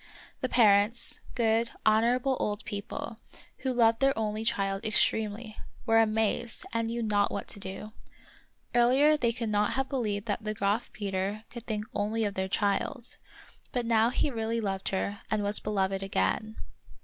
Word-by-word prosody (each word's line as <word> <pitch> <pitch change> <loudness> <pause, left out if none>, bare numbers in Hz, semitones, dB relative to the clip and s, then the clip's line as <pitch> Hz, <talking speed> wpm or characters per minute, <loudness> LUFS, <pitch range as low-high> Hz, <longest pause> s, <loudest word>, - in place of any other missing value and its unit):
The 255 - -2
parents, 215 0 +4 0.2
good, 230 -1 +2 0.2
honorable 240 +5 +3
old 205 0 -2
people, 210 +2 -6 0.4
who 260 - -1
loved 230 -2 +3
their 270 -1 +2
only 215 0 -2
child 195 -2 0
extremely, 215 0 +1 0.3
were 225 -1 +4
amazed, 220 +1 0
and 230 0 0
knew 235 +1 -2
not 205 -2 +2
what - - -4
to - - -6
do. 195 +2 -7 0.8
Earlier 260 +6 +5
they 240 -6 +1
could 230 -1 -3
not 210 0 +1
have 270 0 -1
believed 215 -6 -2
that 210 0 -2
the 215 0 -3
Graf 205 +4 0
Peter 200 +1 -3
could 235 -1 -9
think 215 -2 -2
only 215 +2 0
of 205 - -2
their 190 -1 -2
child; 220 +6 -1 0.5
but 245 -2 -1
now 230 0 +3
he 280 +3 0
really 225 -1 -2
loved 195 -3 -2
her 200 +1 -2
and 215 -1 0
was 205 +1 +3
beloved 195 -2 -1
again. 215 +3 -1
220 Hz, 160 wpm, -29 LUFS, 205-235 Hz, 0.8 s, Earlier